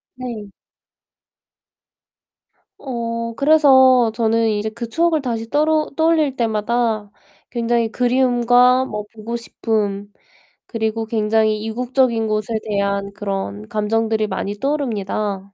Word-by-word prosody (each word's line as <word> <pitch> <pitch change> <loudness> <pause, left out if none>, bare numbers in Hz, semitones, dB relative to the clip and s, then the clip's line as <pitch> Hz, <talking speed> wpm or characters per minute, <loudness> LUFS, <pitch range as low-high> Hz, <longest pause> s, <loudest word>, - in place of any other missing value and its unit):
네. 235 -5 -7 2.3
어 230 -3 -4
그래서 260 -5 +5
저는 225 0 +1
이제 215 0 -1
그 235 +1 -7
추억을 325 +3 +1
다시 225 -3 -3
떠로 305 +1 +1
떠올릴 320 -4 +2
때마다 220 -1 -1 0.4
굉장히 235 -1 0
그리움과 250 0 +3
뭐 210 0 -5
보고 225 +2 -5
싶음, 205 -3 -3 0.5
그리고 225 -1 -2
굉장히 215 -1 +1
이국적인 240 0 0
것에 215 +1 -2
대한 200 -1 -1
그런 195 - -4
감정들이 220 +1 0
많이 205 0 -3
떠오릅니다. 215 -7 -2
230 Hz, 240 characters per minute, -19 LUFS, 215-250 Hz, 2.3 s, 그래서